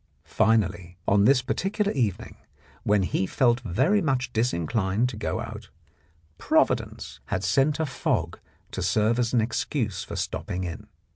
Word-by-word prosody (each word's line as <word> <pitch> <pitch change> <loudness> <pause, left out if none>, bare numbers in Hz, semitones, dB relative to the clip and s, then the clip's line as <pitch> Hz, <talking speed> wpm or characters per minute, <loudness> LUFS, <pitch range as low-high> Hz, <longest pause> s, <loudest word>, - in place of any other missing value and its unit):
Finally, 100 -5 +1
on 100 +1 +4
this 130 0 +4
particular 200 - -1
evening, 115 -9 -2 0.5
when 105 -1 +2
he 95 +1 0
felt 120 0 +2
very 130 - +1
much 130 -5 -1
disinclined 110 0 0
to 125 - -6
go 105 - -2
out, - - -7 0.7
Providence - - 0
had 95 -1 -2
sent 135 - +2
a 160 - +1
fog 135 - -2 0.3
to - - -4
serve 110 +3 +2
as 120 -2 +1
an 120 - +3
excuse 115 -1 -2
for - - -7
stopping 90 +1 -3
in. 85 -2 -6
115 Hz, 145 wpm, -26 LUFS, 100-130 Hz, 0.7 s, on